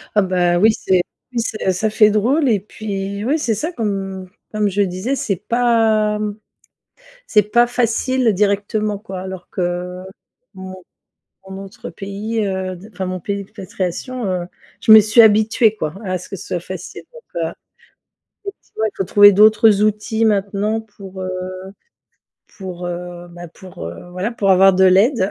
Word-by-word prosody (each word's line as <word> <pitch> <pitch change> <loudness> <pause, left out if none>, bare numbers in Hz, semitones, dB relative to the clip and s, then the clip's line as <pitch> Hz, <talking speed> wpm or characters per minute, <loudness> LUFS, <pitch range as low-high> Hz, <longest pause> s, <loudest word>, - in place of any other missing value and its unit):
Ah, 210 - +5
bah 180 -2 +1
oui. 220 +3 +5
C'est, 185 -3 +1 0.3
oui, 240 - -1
c'est 215 -4 -1
ça 200 +4 -1
fait 215 0 +5
drôle 255 +8 +2
et 215 -3 +2
puis 200 0 -5
oui, 295 +6 +1
c'est 230 -7 0
ça 310 - -3
qu'on 195 - -4 0.3
comme 210 -1 +1
je 200 +1 0
disais, 195 +7 -1
c'est 205 -6 -1
pas 220 0 +1 1.1
c'est 210 - +4
pas 240 +4 +3
facile 245 0 +1
directement 205 +1 0
quoi 195 -3 -8
alors 185 -1 -8
que, 180 0 -3 0.5
mon 190 0 -8 0.8
mon 190 +1 -7
autre 195 - -10
pays, 205 +5 -4
heu, 190 -1 -3
de 190 +5 -13
enfin 190 +1 -4
mon 185 0 -4
pays 200 +3 -3
d'expatriation, 200 +4 -5
heu, 180 -2 -2 0.3
je - - +3
me 220 - +11
suis 215 +3 +5
habituée 220 0 +4
quoi 155 -7 -4
à 185 -2 -2
ce 180 - -12
que - - -5
ce 185 - -10
soit 175 - -2
facile 185 +2 -8
donc, 485 - -12 0.2
heu, 160 - -2 0.9
effectivement, 395 - -6
il 215 - -4
faut 195 - -1
trouver 205 +2 +7
d'autres 215 0 +5
outils 215 +1 0
maintenant 205 +1 0
pour, 200 -3 -12
heu 185 - -3 1.3
pour, 180 -2 -6
heu, 175 0 -7
bah, 175 0 -10
pour, 175 - -10
heu, 85 - -9
voilà, 185 +5 -2
pour 200 -4 0
avoir 190 +1 +6
de 190 +1 +4
l'aide. 195 +3 +4
200 Hz, 165 wpm, -19 LUFS, 185-220 Hz, 1.3 s, me